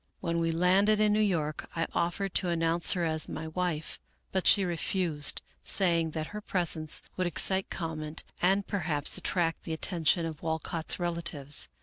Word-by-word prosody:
" - - -43
When 170 -2 -1
we 165 0 +1
landed 190 +6 +3
in 210 -1 +4
New 210 - +2
York 165 -8 -1
I 165 0 0
offered 175 +3 -1
to 180 - +1
announce 165 0 +1
her 175 -2 0
as 160 -1 +1
my 160 0 -5
wife, 160 -2 -3 0.3
but 190 -1 +1
she 195 - +6
refused, 170 -3 -1 0.2
saying 170 -4 +2
that 155 - -2
her 210 - -5
presence 165 -5 0
would 185 -1 +1
excite 190 +4 +3
comment 160 -2 -4 0.2
and 195 +2 +3
perhaps 155 -7 +1
attract 170 -3 -1
the 165 - -5
attention 165 0 +1
of 160 -2 -6
Walcott's 160 +1 -2
relatives. 165 -5 -1
170 Hz, 165 wpm, -29 LUFS, 160-185 Hz, 0.3 s, she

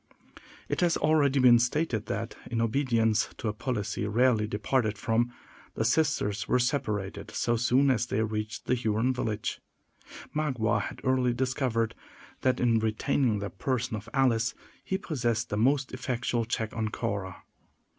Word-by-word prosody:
It - - -1
has 175 -2 +3
been - - -4
already 140 -5 +5
stated 120 -2 0
that, 110 +3 -3 0.2
in 120 -1 -1
obedience 115 -2 +2
to 115 - -2
a - - -2
policy 105 -3 -2
rarely 115 0 +3
departed 110 +1 0
from, 120 +3 +1 0.4
the 110 - 0
sisters 120 -6 +1
were - - +3
separated 120 -7 -1
so 120 - 0
soon 125 +4 +3
as 120 -1 0
they 110 -1 0
reached 110 0 -4
the - - +1
Huron 115 +1 +1
village. 110 -4 -3 0.8
Magua 120 -8 +1
had - - -6
early 130 -2 +2
discovered 125 -3 0 0.5
that 130 -1 +2
in 115 -2 +3
retaining 110 +1 +1
the 100 0 -4
person 125 -3 -2
of 105 +1 -7
Alice, 120 -3 +2 0.3
he 190 - -1
possessed 120 - -2
the - - 0
most 130 +4 +2
effectual 125 -2 -1
check 110 -1 -3
on 110 -1 -1
Cora. 100 -5 -4
120 Hz, 150 wpm, -28 LUFS, 110-130 Hz, 0.8 s, already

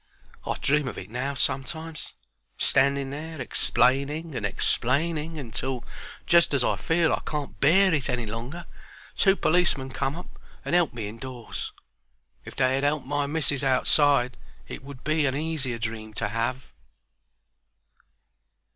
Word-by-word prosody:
I - - -1
dream 150 -1 +1
of - - -5
it - - -8
now 135 +4 -2
sometimes: 160 +5 -2 0.4
standing 140 0 +2
there 155 +2 -6
explaining 140 +6 +1
and 115 -6 -1
explaining, 155 - 0
until, 130 -1 -4 0.4
just 170 -4 +4
as 130 - +2
I - - +2
feel 165 0 +2
I - - 0
can't 150 -2 -5
bear 185 +6 +5
it 145 -5 0
any 120 -2 -1
longer, 120 +11 -6 0.5
two 195 -1 +4
policemen 160 -8 +2
come 135 +3 -2
up 175 - -11 0.3
and - - -2
'elp 175 -4 +3
me 115 -4 -5
indoors. 120 +2 -6 0.7
If - - -10
they 130 0 +2
had 135 +1 0
'elped 145 -1 +1
my 145 +1 -1
missis 145 -2 0
outside 135 -1 +3 0.3
it - - -8
would 135 -2 -11
be 155 -1 +2
a 130 - 0
easier 145 -5 -1
dream 110 -1 -5
to 115 -1 -1
have. 115 +4 -2
140 Hz, 145 wpm, -26 LUFS, 125-155 Hz, 0.7 s, bear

